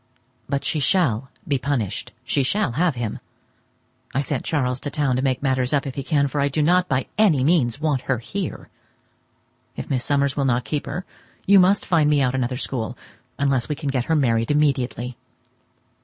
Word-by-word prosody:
But 140 0 -1
she 155 - 0
shall 135 - +2 0.2
be 140 -3 +1
punished, 120 -4 -2
she 130 +2 +1
shall 190 - +1
have 160 +3 +1
him. 120 -3 -3 1.0
I - - +1
have 140 - +1
sent 140 -2 -2
Charles 130 -5 0
to 145 - -4
town 140 -3 0
to 130 - 0
make 130 0 0
matters 130 -1 +1
up 145 -1 +1
if 135 - -4
he 140 - -4
can, 140 0 +1
for 140 +1 -2
I 140 - +3
do 150 +2 0
not 180 +3 +3
by 130 -1 +1
any 165 -12 +4
means 145 -5 +2
want 150 -4 0
her 135 - +3
here. 180 - -5 1.1
If - - -6
Miss 130 -2 0
Summers 140 0 +1
will 140 - 0
not 120 -2 +1
keep 145 +6 -3
her, 180 - -4 0.4
you 200 0 +7
must 190 +3 +4
find 160 -4 +3
me 150 -1 +3
out 130 -2 +2
another 125 -1 -1
school, 125 -3 -3 0.4
unless 135 -3 +1
we 150 - -1
can 145 -1 -4
get 130 -3 -1
her 160 - +1
married 115 -6 +2
immediately. 130 -4 0
140 Hz, 200 wpm, -23 LUFS, 125-150 Hz, 1.1 s, you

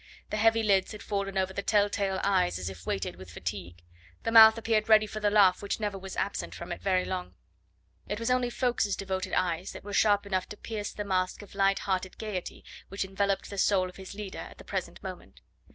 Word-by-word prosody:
The 215 - -1
heavy 225 +1 +4
lids 195 -1 +2
had 210 - -9
fallen 200 -1 -2
over 190 0 0
the 200 - -2
tell 205 0 +3
tale 195 -2 -1
eyes 185 - +2
as 95 0 -4
if 90 -1 -12
weighted 95 -2 -2
with 95 0 -11
fatigue, 85 0 -6 0.4
the 225 - -1
mouth 220 0 +9
appeared 225 -1 0
ready 215 -1 +7
for 215 0 -6
the 210 -1 +2
laugh 200 -3 +5
which 200 +2 -3
never 205 -2 -2
was 195 0 -7
absent 200 - -2
from - - -7
it - - -5
very 185 -2 +1
long. 185 -1 -4 0.7
It 210 - -2
was 230 +2 0
only 250 -1 +2
Ffoulkes's 240 -5 0
devoted 190 -1 -3
eyes 175 0 -1
that - - -9
were 205 0 -7
sharp 205 0 +3
enough 185 -2 -1
to 210 - -8
pierce 210 -2 -5
the 205 - -5
mask 185 0 -1
of 200 - -14
light 195 0 +3
hearted 190 -1 -2
gaiety 205 -5 -5 0.2
which 195 0 -2
enveloped 195 +1 -1
the 200 - -4
soul 190 -2 +3
of 180 - -14
his 190 +1 -9
leader 205 -2 -6
at - - -9
the - - -12
present - - -5
moment. - - -9
200 Hz, 225 wpm, -29 LUFS, 185-210 Hz, 0.7 s, mouth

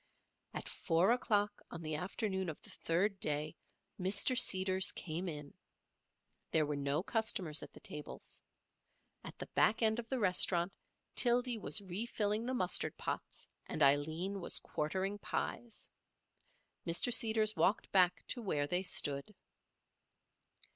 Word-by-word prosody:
At - - -5
4 175 +5 +2
o'clock 210 -4 +1
on 170 -1 -8
the 155 0 -3
afternoon 190 +3 -2
of 155 - -6
the - - -11
third 190 +4 0
day 150 -1 -1 0.4
Mr. 200 +7 +3
Seeders 190 -5 +4
came 175 +2 -4
in. 150 -2 -7 1.0
There 155 -1 +2
were 150 0 -2
no 140 +3 -1
customers 195 -9 +1
at - - -9
the - - -13
tables. 180 -8 -7 0.8
At - - -9
the - - -6
back 225 +2 +3
end 220 +1 +2
of 230 -1 -7
the 265 - -1
restaurant 180 -3 +2 0.4
Tildy 245 0 +3
was 205 - +3
refilling 210 +3 -1
the 260 - -1
mustard 185 -6 +1
pots - - -4 0.2
and 155 - 0
Aileen 160 +8 +2
was - - +2
quartering 190 +6 -2
pies. 230 +2 -4 1.0
Mr. 170 +8 +3
Seeders 220 -2 +3
walked 200 - +1
back 180 -3 +3
to 245 - -2
where 150 -9 0
they 180 +5 0
stood. 145 0 -1
190 Hz, 135 wpm, -35 LUFS, 160-215 Hz, 1.0 s, Seeders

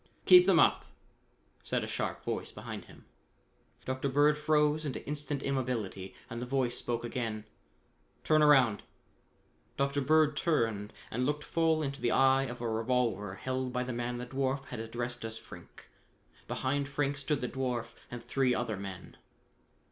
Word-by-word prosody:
"Keep 180 0 +8
them 185 -4 +6
up!" - - +4 0.8
said - - -1
a - - -4
sharp - - -3
voice - - -3
behind - - -7
him. - - -16 0.8
Dr. 130 +1 -1
Bird 145 +2 +4
froze 150 0 +2
into 140 -4 -4
instant 145 -1 -3
immobility 120 -8 -2
and 120 -2 -6
the - - -3
voice 125 -2 0
spoke 120 -1 -2
again. 115 -3 -3 0.8
"Turn 155 0 +4
around!" 130 -8 +5 1.0
Dr. 140 +1 +1
Bird 155 +1 +4
turned 115 -11 0 0.2
and 125 +3 0
looked 150 0 -1
full 160 -1 +1
into 140 0 -4
the 120 - +2
eye 135 +1 +4
of 125 -2 -7
a 120 - -1
revolver 110 -3 0
held 130 +3 -3
by 125 0 -1
the 125 0 -4
man 120 +1 -3
the 125 - -5
dwarf 135 +1 -1
had 125 - -5
addressed 120 +2 -4
as 110 0 -5
Frink. 110 - -13 0.6
Behind 140 +2 -1
Frink 145 0 -1
stood 145 0 -1
the 125 - -1
dwarf 125 -2 -3 0.2
and 120 -1 -7
three 125 +1 +1
other 115 -4 -2
men. 95 -2 -8
130 Hz, 160 wpm, -31 LUFS, 120-145 Hz, 1.0 s, Keep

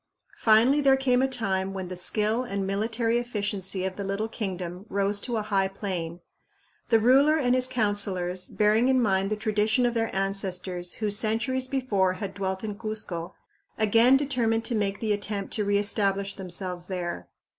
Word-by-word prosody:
Finally, 235 +6 +4
there 270 -1 +5
came 255 -2 +2
a 265 - +3
time 195 -7 -2
when 190 -1 -4
the 185 - -6
skill 215 +5 +1
and 200 -5 -3
military 225 +4 0
efficiency 205 -5 -3
of 190 0 -4
the 200 - -4
little 200 +3 -2
kingdom 185 -5 -5
rose 200 +1 0
to 240 -2 -3
a 215 - -1
high 195 -2 +1
plane. 180 -4 -5 0.7
The 225 - +5
ruler 275 +7 +5
and 250 -5 +2
his 255 0 +2
councilors, 200 -6 0
bearing 215 +3 +2
in 260 -1 +4
mind 195 -4 +1
the 215 - 0
tradition 215 +3 +1
of 240 - +1
their 225 -1 0
ancestors 185 -2 -1
who 215 -2 -2
centuries 230 +5 +1
before 215 -9 0
had 195 0 -6
dwelt 190 0 -3
in 210 -1 -5
Cuzco, 215 -6 -5 0.4
again 225 +4 +5
determined 235 -5 0
to 245 - +1
make 200 -2 -1
the 215 -2 +1
attempt 205 -1 -3
to 210 - 0
reestablish 200 -1 +1
themselves 180 -1 -4
there. 180 -2 -4
205 Hz, 170 wpm, -26 LUFS, 190-230 Hz, 0.7 s, there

